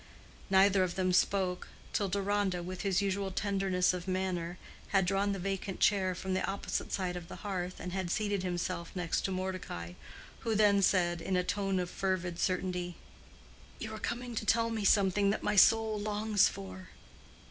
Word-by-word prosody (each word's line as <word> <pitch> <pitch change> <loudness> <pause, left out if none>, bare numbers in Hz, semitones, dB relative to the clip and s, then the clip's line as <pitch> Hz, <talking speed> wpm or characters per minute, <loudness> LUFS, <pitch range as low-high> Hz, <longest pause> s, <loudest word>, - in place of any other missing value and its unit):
Neither 195 0 +5
of 175 -1 -2
them 185 -1 +1
spoke, 185 -1 +1 0.3
till 200 -2 0
Deronda, 200 -2 0
with 185 +1 -5
his 195 -1 +1
usual 195 0 -1
tenderness 190 -2 +1
of 180 0 -5
manner, 185 -2 -2 0.3
had 195 -2 +2
drawn 200 +2 +1
the 200 - -2
vacant 195 0 -3
chair 190 -3 +3
from 190 +1 -3
the 185 - 0
opposite 195 +1 -3
side 180 -2 -1
of 175 -1 -7
the - - -8
hearth 185 -2 -3
and 180 - -5
had 190 -2 -2
seated 205 0 0
himself 175 -1 -3
near 175 -2 -3
to 190 - 0
Mordecai, 185 - -4 0.5
who 225 -1 -1
then 205 -1 +5
said, 175 -3 +2
in 185 +2 0
a 180 - +2
tone 195 0 -1
of 180 - -1
fervid 180 -2 -2
certainty, 180 -1 -1 0.8
"You 220 -1 -6
are 215 - -6
coming 245 +2 -4
to 220 - -2
tell 230 +1 +2
me 220 -3 -2
something 200 0 +4
that 200 - -1
my 210 - +1
soul 220 +1 +5
longs 210 0 +2
for." 95 -1 -9
190 Hz, 180 wpm, -32 LUFS, 180-200 Hz, 0.8 s, Neither